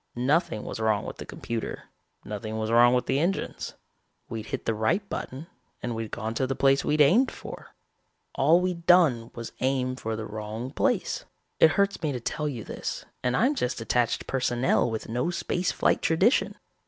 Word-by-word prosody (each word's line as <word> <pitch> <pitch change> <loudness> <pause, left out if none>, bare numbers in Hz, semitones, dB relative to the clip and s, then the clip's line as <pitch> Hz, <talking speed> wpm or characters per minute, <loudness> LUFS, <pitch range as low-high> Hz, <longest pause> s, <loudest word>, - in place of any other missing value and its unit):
Nothing 140 - +1
was - - -6
wrong 110 -2 +1
with - - -6
the - - -8
computer. 115 -1 -5 0.4
Nothing 110 +1 -5
was 110 0 -2
wrong 120 +1 +6
with 125 - +1
the 135 - +1
engines. 175 +5 -2 0.5
We'd 110 -1 -5
hit - - -4
the 115 - +1
right 110 - 0
button 135 +5 -5 0.4
and 120 - -2
we'd 115 -1 -4
gone 110 +2 -4
to 130 +2 0
the 135 - -1
place 135 +1 +3
we'd 150 0 +2
aimed 215 - +5
for. - - -10 0.6
All 155 +6 +4
we'd 180 -2 -3
done 145 -11 +5
was 115 -1 -6
aim 130 -1 0
for 115 -3 -3
the 110 0 -5
wrong 110 +4 -5
place. - - 0 0.3
It 160 - +6
hurts 200 0 +1
me 155 - 0
to 125 - -3
tell 150 +5 -2
you 120 -6 -5
this - - -5 0.2
and 125 0 +1
I'm 260 +5 +3
just 125 - -2
attached 115 +1 0
personnel 125 -1 +1
with 110 -1 -4
no 125 +8 -1
space 180 0 -1
flight - - +2
tradition. 190 - +3
125 Hz, 185 wpm, -27 LUFS, 115-160 Hz, 0.6 s, wrong